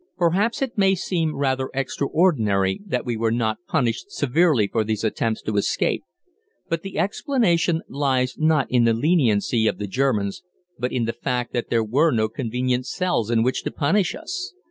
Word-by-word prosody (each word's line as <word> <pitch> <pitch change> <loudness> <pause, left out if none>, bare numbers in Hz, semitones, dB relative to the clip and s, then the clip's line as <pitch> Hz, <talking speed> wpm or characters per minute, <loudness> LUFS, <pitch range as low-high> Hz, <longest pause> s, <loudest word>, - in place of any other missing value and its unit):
Perhaps 190 +9 +1
it 240 -5 -4
may 195 -1 +4
seem 170 -4 -1
rather 130 -1 0
extraordinary 130 - +1
that 125 -8 -2
we 120 -2 -1
were 115 0 0
not 110 -1 0
punished 155 - -1
severely 145 - +2
for 110 +2 0
these 110 -1 -2
attempts 110 0 -1
to 105 -1 -2
escape, 100 - 0 0.6
but 165 0 -2
the 195 +1 -7
explanation 180 - +1
lies 130 -3 0
not 155 -3 +2
in 125 -2 +4
the 115 - +4
leniency 115 - +2
of - - 0
the 105 - -4
German 105 -2 0 0.5
but 125 +1 -1
in 120 -2 0
the 115 - -2
fact 125 0 -3
that 120 - -2
there 115 -1 +2
were 135 +10 +2
no 110 -5 +1
convenient 125 +2 -2
cells 180 - -1
in 115 -1 +2
which 130 +2 0
to - - -3
punish 175 +6 +1
us. 380 0 -6
130 Hz, 175 wpm, -23 LUFS, 115-165 Hz, 0.6 s, may